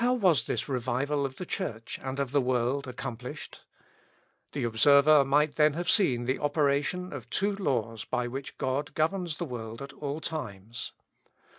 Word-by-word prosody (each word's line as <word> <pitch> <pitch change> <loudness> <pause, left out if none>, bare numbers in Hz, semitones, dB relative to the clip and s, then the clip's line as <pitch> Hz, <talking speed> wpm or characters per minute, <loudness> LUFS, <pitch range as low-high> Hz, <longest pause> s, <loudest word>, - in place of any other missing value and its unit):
How 250 +1 +4
was 185 - +3
this - - -1
revival 135 +2 0
of 130 - -12
the 185 - -6
Church 115 - -4
and 130 +1 -4
of 135 -3 -1
the 140 -1 +3
world 130 +2 0
accomplished? 125 +2 -7 0.9
The 140 - -2
observer 140 +6 +6
might 145 +2 +2
then 150 -1 +5
have 175 +3 +1
seen 130 - +3
the 130 +2 0
operation 145 +4 0
of 125 -4 -8
two 200 - 0
laws 115 - -1
by 125 +1 -1
which 135 +3 -6
God 135 +3 -2
governs 165 0 0
the 175 - -2
world 115 -4 -6
at 140 0 -8
all 145 +1 -4
times. 120 -8 -5
140 Hz, 165 wpm, -29 LUFS, 125-155 Hz, 0.9 s, observer